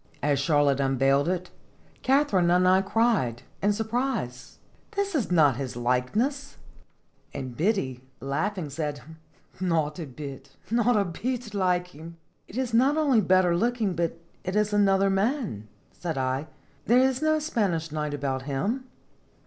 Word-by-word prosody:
As 145 -2 +2
Charlotte 145 -2 +2
unveiled 135 +1 +2
it, 180 0 -3 0.5
Katharine 260 -10 +3
and 180 +1 +4
I 185 +1 +5
cried, 195 - +1 0.2
in 205 - +3
surprise: 220 - -3 0.2
" - - -35
This 400 -1 -1
is 275 -9 0
not 150 -8 +4
his 130 -3 -4
likeness! 205 - -1 0.3
" - - -39
And 130 -3 -5
Biddy, 150 - 0 0.2
laughing, 155 +4 -2
said: 150 -1 -3 0.3
" - - -32 0.2
Not 160 -3 0
a 160 - -5
bit, 135 0 -9 0.2
not 235 0 +3
a 200 - +2
bit 230 +5 -4
like 180 -2 +1
him!" 165 +1 -11 0.3
"It 210 - -9
is 255 -3 -2
not 265 +6 +4
only 280 -8 +4
better 185 -2 +3
looking, 230 0 0
but 170 -1 -1 0.3
it 185 +1 -3
is 210 0 +1
another 195 -1 +3
man," 195 - -1 0.2
said 165 -4 -5
I; 130 +3 -1 0.4
"there 240 - +5
is 260 +1 +3
no 310 0 +3
Spanish 200 - -1
knight 150 -1 -2
about 135 -2 -2
him." 210 - -1
180 Hz, 155 wpm, -26 LUFS, 145-230 Hz, 0.5 s, I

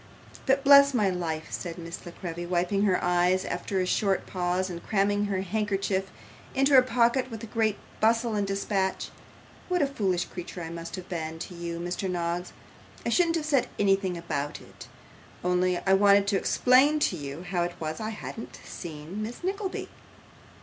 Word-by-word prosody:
'But 270 +1 +3
bless 280 -1 +8
my 205 -5 +3
life,' 160 -3 -3
said 175 -1 -5
Miss 170 0 -7
La - - -6
Creevy, 175 -1 -6
wiping 180 +3 +1
her 185 -3 +3
eyes 180 +1 +2
after 195 - -2
a 185 - +1
short 195 +1 +1
pause, 180 0 -1
and 170 -2 -7
cramming 205 0 +1
her 195 -2 -1
handkerchief 195 -1 -1 0.5
into 275 +1 +3
her 260 - +9
pocket 250 +1 +2
with 225 -1 -7
great 220 -3 +1 0.2
bustle 230 +1 +2
and 205 -1 0
dispatch; 195 -1 -1 0.6
'what 360 -3 +2
a - - +4
foolish 195 -10 0
creature 175 -1 -7
I 165 - -6
must 170 0 -6
seem 165 -3 -5
to 175 +2 -7
you, 170 -1 -5
Mr. 175 +2 -3
Noggs! 175 0 -2 0.5
I - - +1
shouldn't 340 -2 +3
have 320 -2 -1
said 280 -5 +2
anything 195 -2 +2
about 145 -4 -3
it, - - -13 0.6
only 180 0 +2
I 190 +2 +2
wanted 200 0 +5
to 200 - +1
explain 260 +8 +4
to 185 - +2
you 145 +1 -6
how 180 -1 -1
it 175 0 -2
was 155 -1 -4
I 215 0 -3
hadn't 225 +1 -7
seen 165 +4 -7
Miss 230 +9 -6
Nickleby. 385 +1 -3
190 Hz, 175 wpm, -27 LUFS, 175-225 Hz, 0.6 s, her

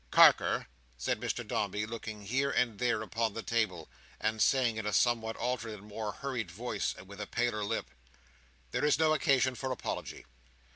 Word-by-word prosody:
"Carker," - - +6 0.3
said - - -1
Mr - - -2
Dombey, 105 +1 -1
looking 110 -2 -6
here 135 +6 +1
and 125 -6 +1
there 120 -3 +1
upon 110 +1 -1
the 115 - -4
table, 100 -9 0 0.3
and 110 0 0
saying 125 -5 +3
in 110 - -3
a 105 - -1
somewhat 115 -2 +2
altered 115 -3 -2
and 100 - -12
more 105 0 -4
hurried 125 -5 -4
voice, 105 +3 -2
and 95 - -11
with 100 +1 -9
a 105 - -4
paler 115 -3 0
lip, 100 - -2 0.8
"there - - -1
is 150 -1 +4
no 155 0 +4
occasion 135 -4 +3
for 130 +2 -3
apology. 130 - -4
110 Hz, 180 wpm, -32 LUFS, 105-125 Hz, 0.8 s, Carker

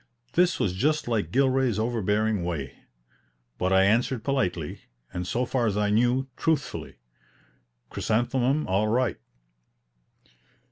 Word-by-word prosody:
This 180 +1 +3
was 90 - +1
just 150 +10 0
like 105 -8 -1
Gilray's 130 -3 +2
overbearing 110 -3 0
way; 80 -6 -4 0.8
but 90 +1 0
I 95 0 +5
answered 115 +3 +2
politely, 90 - -1 0.3
and 90 0 -4
so 125 +6 0
far 125 -2 0
as 105 -1 -1
I 105 0 +1
knew, 120 +4 +2
truthfully, 160 -5 -1 1.0
"Chrysanthemum 125 +6 0
all 95 +3 +1
right." 120 +2 0
115 Hz, 120 wpm, -26 LUFS, 95-130 Hz, 1.0 s, I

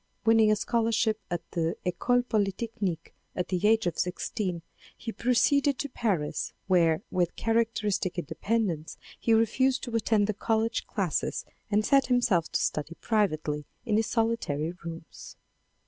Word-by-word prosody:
Winning 225 -1 +5
a - - +4
scholarship 225 -1 +1
at 175 -2 -2
the 165 -1 -1
Ecole 245 +8 +2
Polytechnique 205 -5 -2 0.2
at 180 - -2
the 185 +2 +1
age 220 -1 +4
of 175 - -2
sixteen 180 -1 -2 0.3
he 230 - -5
pro 250 +2 0
ceeded 280 +2 +3
to 285 - -2
Paris, 195 - -1
where 170 -2 +3
with 175 -2 0
characteristic 225 -5 0
independence 175 0 -2 0.2
he 230 - 0
refused 245 +4 +3
to 240 -3 -4
attend 220 -2 +2
the 215 - -1
college 225 +2 0
classes 185 -8 -1 0.2
and 210 0 +2
set 275 -1 +4
himself 240 -9 +2
to - - +1
study 155 +2 -2
privately 155 -9 0 0.2
in 215 - +1
his 220 0 +1
solitary 225 -11 0
rooms. 165 -1 -9
215 Hz, 145 wpm, -28 LUFS, 175-230 Hz, 0.3 s, Winning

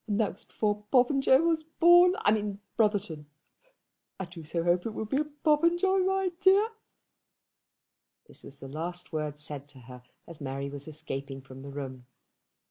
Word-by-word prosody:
That 210 -1 +1
was - - -18
before 210 -1 -2
Popenjoy 265 +1 +5
was 330 -1 +1
born, 350 +3 +5
I 205 - +6
mean 205 -2 -1 0.2
Brotherton. 200 -9 0 0.9
I 190 - -3
do 170 -2 -11
so 165 +2 -2
hope 175 +3 +1
it 220 - -6
will 220 - -3
be 240 +6 -1
a - - -2
Popenjoy, 335 +6 +2
my 380 0 +1
dear." 390 +4 +5 1.6
This - - -14
was 140 - -11
the 135 - -10
last 170 +5 -6
word 150 -2 -3
said 145 -2 -7
to 140 -2 -16
her 125 +1 -12 0.3
as 170 -3 -11
Mary 140 0 -4
was 145 +1 -8
escaping 140 -3 -6
from 130 0 -12
the 140 - -9
room. 130 -3 -7
185 Hz, 165 wpm, -29 LUFS, -, 1.6 s, I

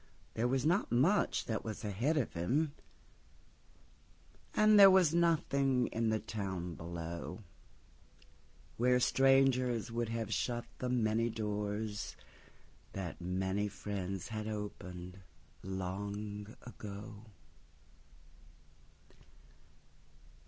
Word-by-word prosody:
There 115 +2 +1
was 130 +2 0
not 175 +6 +2
much 160 +13 +3
that 110 -3 -2
was 110 -1 -5
ahead 120 +11 0
of 130 - 0
him, 140 - 0 1.8
And 215 0 +6
there 195 -1 +11
was 185 -5 +5
nothing 140 -7 +2
in 115 0 +1
the 110 - +2
town 95 -6 -4
below—Where 85 - -5
strangers 130 -3 +3
would 115 -1 -1
have 115 -2 -2
shut 120 +2 -1
the 125 - -2
many 115 -1 +2
doorsThat 105 -1 -3 1.0
many 95 +3 -1
friends 95 -2 -4
had 110 -1 -4
opened 90 -3 -6 0.4
long 100 +3 -5
ago. 105 -1 -9
110 Hz, 90 wpm, -34 LUFS, 100-125 Hz, 1.8 s, there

